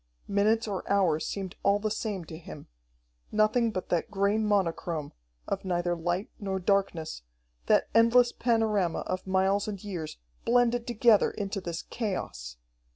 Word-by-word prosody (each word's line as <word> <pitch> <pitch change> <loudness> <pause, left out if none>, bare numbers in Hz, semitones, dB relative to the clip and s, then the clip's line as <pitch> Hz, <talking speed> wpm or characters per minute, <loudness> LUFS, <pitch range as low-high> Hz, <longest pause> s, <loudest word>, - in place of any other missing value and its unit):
Minutes 215 +3 +2
or 195 -3 -3
hours 180 -6 +2
seemed 190 -3 -5
all 200 +1 +3
the 215 +1 -2
same 205 -5 -3
to 160 - -9
him. 160 -3 -10 0.7
Nothing 215 +2 +3
but 185 -4 -5
that 175 -2 0
gray 200 +2 +1
monochrome, 175 -7 -1 0.3
of - - -2
neither 175 -2 0
light 175 +4 -2
nor 195 -2 -2
darkness, 185 - 0 0.5
that - - +4
endless 235 +2 +5
panorama 220 -7 +1
of 185 +1 -4
miles 190 +2 +2
and 200 -2 -5
years, 175 -7 -5 0.3
blended 240 0 +2
together 235 -2 +4
into 200 -1 -4
this 170 -2 -5
chaos! - - -4
200 Hz, 145 wpm, -28 LUFS, 175-215 Hz, 0.7 s, endless